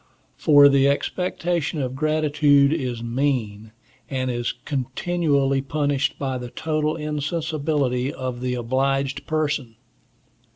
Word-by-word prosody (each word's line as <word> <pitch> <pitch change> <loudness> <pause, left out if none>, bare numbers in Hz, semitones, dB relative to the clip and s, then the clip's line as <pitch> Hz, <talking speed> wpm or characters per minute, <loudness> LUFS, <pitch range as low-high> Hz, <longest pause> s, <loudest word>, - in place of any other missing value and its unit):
For, 145 -2 +6
the 140 -1 +4
expectation 170 +1 -1
of 130 -2 -2
gratitude 150 -1 +3
is 125 -7 -3
mean, 115 -4 -2 0.4
and 130 -2 -1
is 120 -1 -2
continually 140 +1 -1
punished 145 0 -1
by 130 -2 -3
the 125 0 -7
total 155 +2 -1
insensibility 150 -4 -1
of 130 -3 -5
the 125 0 -1
obliged 135 +3 -1
person. 145 -7 -1
140 Hz, 110 wpm, -23 LUFS, 130-150 Hz, 0.4 s, For